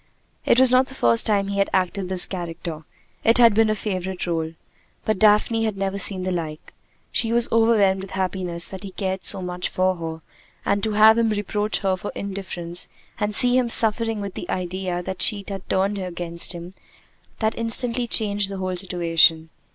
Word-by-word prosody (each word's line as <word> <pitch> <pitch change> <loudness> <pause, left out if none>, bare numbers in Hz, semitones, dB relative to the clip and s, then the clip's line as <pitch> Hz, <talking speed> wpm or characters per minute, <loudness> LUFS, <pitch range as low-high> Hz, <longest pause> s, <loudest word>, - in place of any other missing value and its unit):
It 245 - +4
was 260 -1 +6
not 255 +1 +4
the 265 - -10
first 115 - +2
time 200 -2 +1
he 200 0 -2
had 195 - +1
acted 185 0 -1
this 185 -1 +3
character. 165 -3 -7 0.4
It 230 +1 +3
had 235 -3 +6
been 220 +1 +3
a 215 - +1
favorite 190 -3 -4
role. 165 -2 -3 0.5
But 215 -3 -1
Daphne 220 +1 +3
had 215 -3 -2
never 195 0 -3
seen 190 -1 +1
the 185 - -2
like. 160 -3 -6 0.4
She 225 -1 -1
was 235 0 +4
overwhelmed 220 -4 +3
with 195 - -9
happiness 185 -3 -3
that 190 - -9
he 200 - -7
cared 190 0 -4
so 190 - 0
much 180 0 -4
for 185 0 0
her; 160 -1 -6 0.4
and 200 0 0
to 220 0 -2
have 220 +2 +6
him 230 -1 +2
reproach 210 0 -1
her 190 -1 +1
for 185 +2 -7
indifference, 180 -3 -5 0.3
and 210 0 -1
see 245 +2 +4
him 250 -2 +1
suffering 225 -1 +5
with 200 -2 -6
the 175 - -8
idea 180 0 -3
that 185 +1 -5
she 200 -2 +2
had 195 -2 -8
turned 195 +2 0
against 175 -1 -1
him 175 +1 -9 0.6
that 220 0 0
instantly 235 +1 0
changed 205 -3 +2
the 195 - -6
whole 185 -1 -3
situation. 165 -3 +2
195 Hz, 190 wpm, -22 LUFS, 180-215 Hz, 0.6 s, was